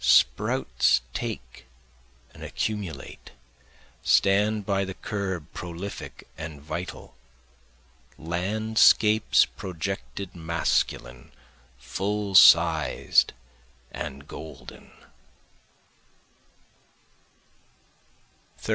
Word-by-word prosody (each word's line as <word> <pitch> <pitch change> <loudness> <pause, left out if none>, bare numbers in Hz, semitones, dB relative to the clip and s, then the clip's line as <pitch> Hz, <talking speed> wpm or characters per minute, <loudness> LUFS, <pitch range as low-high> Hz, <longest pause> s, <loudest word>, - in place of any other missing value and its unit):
Sprouts 60 0 +3
take 65 0 -6 0.7
and - - -14
accumulate, 100 -10 -5 0.7
stand 105 +2 +3
by 100 -1 +1
the 95 -1 -6
curb 95 -8 -4
prolific 90 +3 -7
and 80 -2 -7
vital, 85 +5 -7 1.0
Landscapes 105 +5 +3
projected 95 +1 -6
masculine, 80 -7 -2 0.5
full 100 +11 -3
sized 80 -6 +5 0.6
and 70 +2 -7
golden. - - -11
90 Hz, 60 wpm, -26 LUFS, 80-100 Hz, 1.0 s, sized